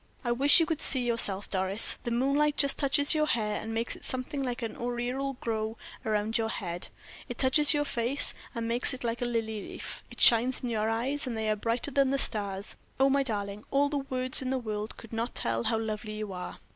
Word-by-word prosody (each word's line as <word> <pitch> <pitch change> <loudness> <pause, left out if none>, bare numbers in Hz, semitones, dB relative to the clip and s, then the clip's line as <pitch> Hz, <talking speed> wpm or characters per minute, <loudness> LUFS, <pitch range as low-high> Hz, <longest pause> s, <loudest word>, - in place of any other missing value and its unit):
I 240 - +1
wish 275 +6 +6
you 330 - +3
could 320 -1 -2
see 255 -3 +2
yourself, 205 -4 +2
Doris. 190 +2 +1
The - - -1
moonlight 275 +5 +1
just 280 -1 +2
touches 285 0 +3
your 305 -1 +1
hair, 210 -5 0
and 225 - -6
makes 225 +1 -2
it - - -15
something 255 +2 -3
like 245 -2 -3
an 225 - -4
aureole 245 +3 -2
of 270 - -9
glory 220 -1 -2 0.3
round 215 +1 0
your 225 0 -1
head; 175 -5 -4 0.4
it 245 - -5
touches 290 +3 +4
your 290 0 +1
face, 250 +1 0 0.2
and 230 -1 -2
makes 240 +3 +5
it 255 - -7
like 235 0 -2
a - - 0
lily 225 -3 -2
leaf; - - -7
it - - -13
shines 245 +1 +5
in 245 - -2
your 220 -1 0
eyes, 260 +6 -1
and 235 -3 -3
they 220 -1 0
are - - +1
brighter 230 +6 -1
than 275 0 +3
the 275 - +1
stars. 200 -5 -2 0.2
Oh, 270 0 +4
my 280 +1 +3
darling, 205 -4 -3
all 285 +1 +2
the 290 -1 -1
words 255 -1 +1
in 255 - -3
the 265 - 0
world 215 -3 -4
could 230 - -12
not 230 +2 -3
tell 115 0 0
how 225 - +1
lovely 215 -1 -4
you 215 -2 -5
are!" 180 0 -7
235 Hz, 230 wpm, -29 LUFS, 220-270 Hz, 0.4 s, wish